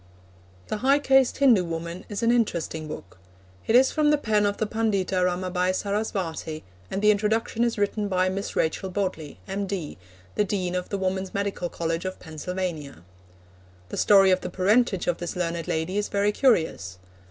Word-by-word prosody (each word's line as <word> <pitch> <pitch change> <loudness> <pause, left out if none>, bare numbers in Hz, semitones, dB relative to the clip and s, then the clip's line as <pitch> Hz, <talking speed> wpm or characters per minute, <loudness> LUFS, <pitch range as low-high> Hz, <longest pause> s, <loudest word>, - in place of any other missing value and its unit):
The - - -1
High 270 +5 +4
Caste 270 -3 +3
Hindu 245 -9 +5
Woman 170 +1 -5
is 205 +2 -4
an 230 - +4
interesting 170 -9 -1
book. 95 -11 -9 0.5
It 225 - +3
is 260 +2 +6
from 305 -1 +2
the 300 - +4
pen 215 -6 +1
of 205 - -2
the 220 - 0
Pundita 200 -4 0
Ramabai 180 0 0
Sarasvati, 190 -6 -3 0.3
and 200 - -3
the 210 - +7
introduction 220 +3 0
is 235 -1 0
written 205 +1 0
by 185 -1 +1
Miss 195 +2 -3
Rachel 165 +4 0
Bodley, 185 -6 -3
M.D., 195 - -4 0.3
the - - +2
Dean 185 -3 -2
of 180 0 -3
the 200 - -2
Woman's 190 0 -2
Medical 200 -3 -2
College 165 +1 -3
of 185 - -4
Pennsylvania. 160 - -5 0.9
The - - -5
story 195 -2 +6
of 185 - +2
the 180 - -4
parentage 195 +2 +2
of 175 -1 0
this 175 +1 -4
learned 170 -2 -2
lady 160 +5 -1
is 210 - -1
very 205 +1 +1
curious. 160 - +1
190 Hz, 175 wpm, -25 LUFS, 175-210 Hz, 0.9 s, the